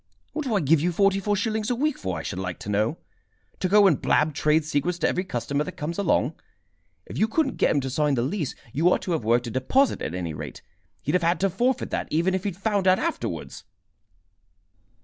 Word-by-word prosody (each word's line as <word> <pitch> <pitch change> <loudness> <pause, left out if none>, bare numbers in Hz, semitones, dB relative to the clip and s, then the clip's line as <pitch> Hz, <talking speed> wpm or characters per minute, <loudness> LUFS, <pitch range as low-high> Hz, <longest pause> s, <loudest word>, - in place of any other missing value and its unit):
"What 305 -1 -3
do 235 -5 0
I 200 - +2
give 150 +1 +3
you 175 +3 +1
forty 195 +2 +3
four 205 +1 0
shillings 215 +1 -1
a 245 - +1
week 295 +3 0
for, 95 -3 -4
I 80 - -5
should 85 - -4
like 95 -2 -4
to - - -6
know? 105 +9 +1 0.6
To 185 - 0
go 205 +1 +6
and 170 -8 +3
blab 155 0 +2
trade 150 +2 +2
secrets 155 +4 0
to - - +1
every 185 - 0
customer 140 -2 -2
that - - -7
comes 165 +5 -4
along? 165 -6 +1 0.7
If - - -7
you 215 - +4
couldn't 275 +4 0
get - - +3
him 145 - +2
to 135 - -3
sign 145 +1 +1
the 120 - 0
lease, 150 +1 -2 0.2
you 165 +5 +3
ought - - +1
to 180 - -3
have 160 -8 0
worked 120 +3 +2
a 120 - -5
deposit, 255 - +2
at - - -3
any 85 -3 -3
rate. - - -8 0.4
He'd 150 - -1
have 180 - +3
had 170 +1 +2
to 195 -1 +2
forfeit 245 +7 0
that, - - -2
even 170 +4 +1
if 190 +1 -2
he'd 195 -4 -2
found 200 -1 0
out 185 0 +6
afterwards." 335 +7 -4
170 Hz, 235 wpm, -25 LUFS, 140-200 Hz, 0.7 s, go